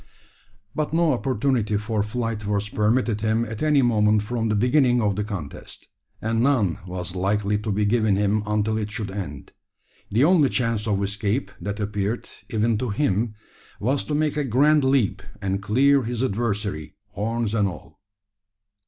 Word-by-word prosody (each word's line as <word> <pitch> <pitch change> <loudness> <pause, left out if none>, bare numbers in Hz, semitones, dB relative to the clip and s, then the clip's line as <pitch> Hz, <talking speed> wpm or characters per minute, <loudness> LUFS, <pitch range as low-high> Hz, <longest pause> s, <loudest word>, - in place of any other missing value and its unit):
But 150 0 -2
no 165 -2 +3
opportunity 120 -4 0
for 105 +1 -1
flight 110 -1 -3
was 105 0 -1
permitted 110 +1 +1
him 110 +1 +1
at 110 -1 -7
any 150 -3 +3
moment 105 -3 +3
from 115 0 -2
the 105 - +1
beginning 125 +2 +3
of 105 -4 +1
the 105 - -1
contest; 95 -9 -8 0.3
and 115 +1 0
none 120 - +2
was 90 -1 -5
likely 100 +2 0
to 105 0 -3
be 105 +1 +1
given 110 -2 +2
him 105 +1 +1
until 105 +1 0
it 105 -1 -3
should 105 -2 -4
end. 90 -9 -6 0.6
The 115 +6 +2
only 155 -4 +5
chance 115 -3 -1
of 100 -2 +1
escape 100 +5 -1
that 100 +3 -4
appeared, 105 +2 -2 0.2
even 110 -1 +1
to 125 - -2
him, 105 -1 0 0.4
was 130 +5 0
to 150 - -2
make 150 0 0
a 150 - +1
grand 140 +4 +3
leap, 130 -7 +2 0.2
and 95 0 -2
clear 135 +8 +3
his 120 +1 -2
adversary, 100 - -2 0.2
horns 115 +1 -2
and 105 -3 +2
all. 85 -2 -9
110 Hz, 165 wpm, -24 LUFS, 100-125 Hz, 0.6 s, only